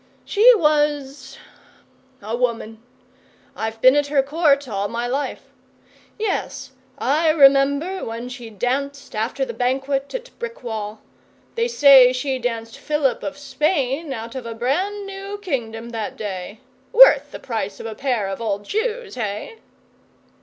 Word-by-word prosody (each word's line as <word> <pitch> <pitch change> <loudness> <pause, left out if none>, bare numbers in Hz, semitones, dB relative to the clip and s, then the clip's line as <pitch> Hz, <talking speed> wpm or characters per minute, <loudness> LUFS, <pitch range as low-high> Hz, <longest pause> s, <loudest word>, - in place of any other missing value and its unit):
She 470 +4 +6
was 295 - 0 0.9
a 220 +3 -3
woman. 230 -2 -2 0.7
I've 220 0 -4
been 255 +2 +7
at 290 0 +2
her 280 -2 +2
Court 285 -1 +2
all 200 -3 -2
my 235 +3 -3
life. 270 +4 -4 0.7
Yes, 390 -10 -3 0.3
I 310 +5 +2
remember 285 +4 +4
when 230 +2 -5
she 245 -2 -8
danced 265 +5 -3
after 235 +5 -1
the - - -6
banquet 270 +2 -1
at - - -6
Brickwall. 225 - -6 0.5
They 465 0 0
say 275 - +7
she 260 +1 -2
danced 230 -2 -4
Philip 295 -4 0
of 285 - -5
Spain 285 +1 -1
out 230 -2 -6
of 255 -3 -6
a 230 - -6
brand 370 - -1
new 395 +1 -7
kingdom 235 - -4
that 225 -3 -5
day. 200 0 -6 0.3
Worth - - +7
the - - -8
price 220 -5 -4
of - - -8
a 225 - -4
pair 245 -5 -1
of 195 +3 -5
old 205 -2 -2
shoes 450 - -2
hey? 230 - -5
270 Hz, 140 wpm, -21 LUFS, 230-300 Hz, 0.9 s, been